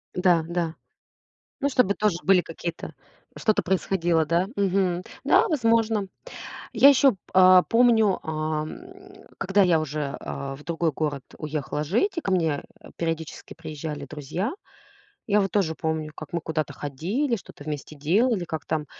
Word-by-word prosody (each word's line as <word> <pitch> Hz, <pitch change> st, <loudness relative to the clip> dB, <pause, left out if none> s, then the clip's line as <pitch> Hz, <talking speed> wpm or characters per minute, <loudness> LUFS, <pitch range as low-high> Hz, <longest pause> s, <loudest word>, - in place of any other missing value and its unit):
Да, 180 Hz, -3 st, +3 dB
да. 170 Hz, -1 st, -2 dB, 0.8 s
Ну, 280 Hz, 0 st, +1 dB
чтобы 250 Hz, -7 st, +3 dB
тоже 210 Hz, -5 st, +1 dB
были 190 Hz, -1 st, +5 dB
какие-то, 165 Hz, 0 st, -6 dB, 0.4 s
что-то 215 Hz, -2 st, +1 dB
происходило, 175 Hz, -3 st, +1 dB
да? 170 Hz, +4 st, +1 dB
Мгм. 190 Hz, -2 st, +1 dB, 0.2 s
Да, -, -, +4 dB
возможно. 225 Hz, -, +2 dB, 0.7 s
Я 245 Hz, +5 st, +8 dB
ещё 275 Hz, -1 st, +6 dB
п 195 Hz, -, -17 dB, 0.2 s
а 185 Hz, -1 st, +7 dB
помню, 230 Hz, -4 st, +4 dB
ам, 155 Hz, 0 st, -3 dB, 0.6 s
когда 195 Hz, +1 st, +3 dB
я 175 Hz, -3 st, +4 dB
уже, 150 Hz, -2 st, -3 dB
а, 135 Hz, 0 st, -5 dB
в 145 Hz, -, -14 dB
другой 165 Hz, -1 st, -1 dB
город 145 Hz, -2 st, -3 dB
уехала 150 Hz, -1 st, -3 dB
жить, 285 Hz, -, 0 dB
и -, -, 0 dB
ко 195 Hz, -, -2 dB
мне, 160 Hz, -5 st, +1 dB, 0.2 s
э, -, -, -13 dB
периодически 165 Hz, -1 st, -4 dB
приезжали 155 Hz, -2 st, -6 dB
друзья, 155 Hz, -, -4 dB, 0.8 s
я 210 Hz, 0 st, +4 dB
вот 195 Hz, -, -1 dB
тоже 180 Hz, -6 st, +1 dB
помню, 160 Hz, -1 st, -2 dB
как 155 Hz, -, -9 dB
мы 170 Hz, -, 0 dB
куда-то 155 Hz, -1 st, -3 dB
ходили, 195 Hz, -, -2 dB
что-то 180 Hz, -, -11 dB
вместе 150 Hz, 0 st, -5 dB
делали, 185 Hz, -, +1 dB
как 160 Hz, -1 st, -5 dB
там 155 Hz, -1 st, -2 dB
170 Hz, 150 wpm, -25 LUFS, 155-200 Hz, 0.8 s, Я